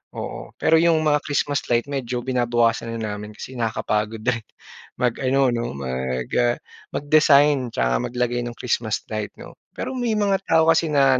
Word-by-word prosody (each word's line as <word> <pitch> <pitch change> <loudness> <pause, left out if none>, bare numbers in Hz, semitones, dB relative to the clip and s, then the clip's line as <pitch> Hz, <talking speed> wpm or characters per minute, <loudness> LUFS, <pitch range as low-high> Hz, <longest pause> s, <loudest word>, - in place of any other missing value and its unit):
Oo, - - -7
pero 160 0 +4
'yong 165 -1 +4
mga 150 -1 +3
Christmas 145 -1 0
light 120 +1 +2
medyo 125 -3 -3
binabawasan 120 -2 +1
na 110 -2 -3
namin 105 +1 -9
kasi - - -8
nakakapagod 110 -1 -1
din 120 -1 +1 0.6
mag-ano, 130 +2 +2
'no, 120 0 -2
mag, 65 -1 -3
ah, 120 -1 +3 0.4
mag-design 145 -2 +4
'tsaka 60 - +1
maglagay 120 0 -1
no'ng 120 -1 -6
Christmas 115 -3 -1
light, 110 -1 -3
'no? - - -11 0.2
Pero - - -4
may 240 -3 0
mga 200 -2 +2
tao 160 0 +4
kasi 165 0 +2
na 135 -3 +4
125 Hz, 160 wpm, -22 LUFS, 110-145 Hz, 0.6 s, pero